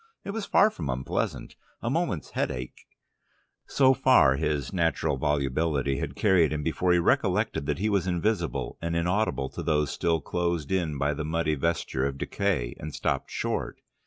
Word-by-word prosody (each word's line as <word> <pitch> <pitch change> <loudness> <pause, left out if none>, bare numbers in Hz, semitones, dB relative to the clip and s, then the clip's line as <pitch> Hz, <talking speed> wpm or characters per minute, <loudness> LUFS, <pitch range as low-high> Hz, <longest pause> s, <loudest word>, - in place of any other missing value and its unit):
It - - -4
was 215 0 -4
far 215 - +5
from 75 - -5
unpleasant, 65 0 -3 0.2
a - - -5
moment's - - -1
headache 60 0 -4 0.4
" - - -43
So 135 -1 +6
far 130 - +5
his 75 -1 -2
natural 85 -6 +1
volubility 70 0 0
had - - -4
carried 95 -6 +3
him 75 -1 -2
before 85 +3 +1
he 90 - +5
recollected 80 -4 +1
that 75 - 0
he 100 +4 0
was 100 -4 +1
invisible 90 0 -1
and 85 0 -2
inaudible 85 -6 0
to - - -7
those 75 -2 +1
still 85 -1 0
closed 85 -1 -2
in 85 -6 0
by 70 +2 +1
the 80 - -4
muddy 80 0 0
vesture 70 -3 -1
of 70 -1 -5
decay, 70 -9 -1
and 75 0 -6
stopped - - -1
short. - - -3
80 Hz, 170 wpm, -27 LUFS, 70-90 Hz, 0.4 s, So